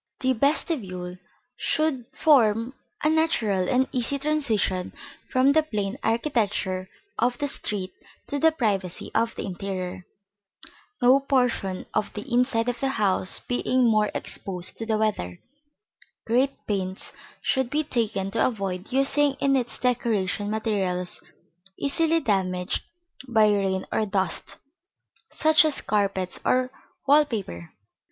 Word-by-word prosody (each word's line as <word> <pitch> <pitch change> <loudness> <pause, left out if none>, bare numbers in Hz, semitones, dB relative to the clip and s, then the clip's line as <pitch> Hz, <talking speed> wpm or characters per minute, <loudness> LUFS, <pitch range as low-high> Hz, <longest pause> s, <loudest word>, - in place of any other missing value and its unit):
The 260 -1 +2
vestibule 210 - -1 0.4
should 310 -6 0
form 235 -5 +3 0.3
a 305 - +4
natural 220 - +1
and 260 +1 +3
easy 255 +3 0
transition 245 -11 0 0.4
from 260 +1 +4
the 315 +2 +5
plain 210 -5 -3
architecture 215 -6 0 0.3
of 245 +1 +2
the 290 - -1
street 200 -8 -3 0.3
to 285 - -2
the 320 +3 +5
privacy 200 - -1
of 230 +1 +1
the - - -4
interior 185 -1 -4
(see - - -11
Plate 200 +2 -24
XXVIII). - - -14 0.3
No 260 +2 +7
portion 250 -9 0
of 215 - -1
the 210 - -5
inside 240 -2 +2
of 245 -1 -1
the 270 - 0
house 200 -6 0
being 250 +1 +1
more 215 -2 +3
exposed 180 -2 -4
to 225 - -4
the 220 -1 +1
weather, 195 - -1 0.9
great 255 +4 +1
pains 190 -2 -3 0.3
should 265 -2 0
be 300 +3 0
taken 220 -8 -1
to 225 - +2
avoid 195 -3 -4
using 275 +2 +2
in 275 0 +1
its 245 -3 0
decoration 215 -5 0
materials 195 -5 -2 0.6
easily 325 +3 +2
damaged 185 -4 0 0.4
by 220 -3 +4
rain 195 -2 0
or 215 - 0
dust, 190 -3 0 0.7
such 315 0 +5
as 310 -3 0
carpets 195 -3 -1
or 255 0 +2 0.4
wall 295 +2 +7
paper. 195 - -6
225 Hz, 135 wpm, -25 LUFS, 195-265 Hz, 0.9 s, No